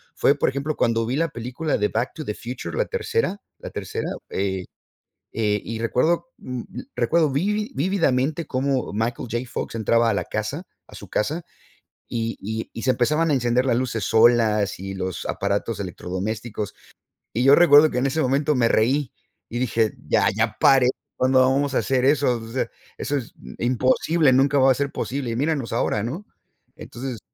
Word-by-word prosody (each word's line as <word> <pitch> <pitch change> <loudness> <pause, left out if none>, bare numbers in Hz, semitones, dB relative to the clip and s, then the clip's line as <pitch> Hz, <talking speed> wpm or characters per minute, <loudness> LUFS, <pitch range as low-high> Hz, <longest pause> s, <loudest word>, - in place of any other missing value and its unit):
fue, 140 - +4
por - - +1
ejemplo, 140 +3 -3
cuando 115 -1 +1
vi 125 +4 -2
la 165 +1 +2
película 125 +6 -3
de 105 - +1
Back 120 +4 -2
to 155 - -5
the 105 - -2
Future, 125 - -6
la - - +2
tercera 455 - -1 0.2
la - - -7
tercera, - - -4 0.2
eh, 95 -1 -2 0.7
eh, 105 -2 0
y 115 0 -4
recuerdo, 160 - +1
mm, 125 -2 -5 0.3
recuerdo 160 -3 +2
vivi 210 +9 -1
vívidamente 155 -2 +1
cómo 130 -2 -1
Michael 115 +2 -2
J. 120 - 0
Fox - - -5
entraba 115 +1 +2
a 105 - +1
la 90 -3 -1
casa 120 - -4 0.2
a - - -14
su - - -11
casa, 155 +10 -1 0.6
y 115 -1 -3
y 110 +2 -4
y 115 - -6
se 130 - +2
empezaban 150 +6 +1
a - - +3
encender 125 0 +2
las 120 -3 +2
luces 120 -4 -1
solas 110 -3 +3
y 95 0 -5
los 95 -1 -4
aparatos - - -2
electrodomésticos. 105 +3 -4 0.6
Y 120 +3 0
yo 135 - +7
recuerdo 155 -2 +7
que 125 - 0
en 135 - +1
ese 155 +4 0
momento 140 +2 +1
me 115 -2 +3
reí 130 +4 +2 0.4
y 120 - -3
dije: 115 -3 +1 0.2
"Ya, - - +4
ya 110 0 0
paré 135 -2 +5 0.3
¿cuándo 130 0 +3
vamos 135 +2 +2
a - - +4
hacer 130 -2 0
eso? 135 -4 +3
O 115 - -9
sea, 130 - -1 0.3
eso 145 - -2
es 120 - -7 0.3
imposible, 130 +4 +2
nunca 140 +2 +3
va 130 0 +6
a - - +2
ser 140 +2 -2
posible". 130 -2 -3
Y - - -2
míranos 145 -4 -1
ahora, 105 - 0
¿no? 155 - -5 0.5
Entonces 125 -1 -6
125 Hz, 180 wpm, -23 LUFS, 115-145 Hz, 0.7 s, yo